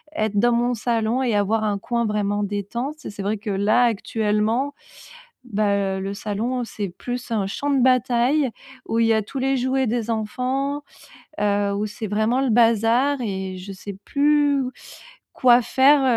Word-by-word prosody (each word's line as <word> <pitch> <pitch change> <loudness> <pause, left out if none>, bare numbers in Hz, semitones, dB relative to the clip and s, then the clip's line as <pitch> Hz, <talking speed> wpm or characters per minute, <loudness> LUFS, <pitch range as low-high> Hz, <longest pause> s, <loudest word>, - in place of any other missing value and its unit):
être 215 -1 -1
dans 240 +2 +4
mon 240 +1 +1
salon 230 +1 0
et 235 -4 +1
avoir 215 +2 +1
un 205 -1 0
coin 235 +2 -1
vraiment 205 -1 0
détente. 235 +9 -4
Et - - -4
c'est 205 -1 -7
vrai 210 +2 -1
que 210 - -7
là, 205 +5 +3
actuellement, 220 +4 0 0.7
bah 210 -3 0 0.2
heu, - - -4
le 195 +1 -3
salon, 225 +5 -2
c'est 210 -3 -5
plus 245 +8 -6
un 210 -4 0
champ 285 +8 -3
de 270 -3 +2
bataille 255 +2 +3 0.4
où 225 - 0
il 230 - +4
y 225 - +4
a 220 - +3
tous 240 +6 -7
les 270 +1 +1
jouets 260 +1 +1
des 230 0 -1
enfants, 260 +6 -2 0.6
heu, 205 -1 +1
où 205 +1 -1
c'est 215 +1 -6
vraiment 220 +5 +1
le 270 - +1
bazar 235 +4 +3
et 190 -4 -4
je 185 +2 -9
sais 195 0 -8
plus 290 -1 +2 0.7
quoi 245 -1 +5
faire, 275 +4 +4
230 Hz, 175 wpm, -22 LUFS, 205-255 Hz, 0.7 s, quoi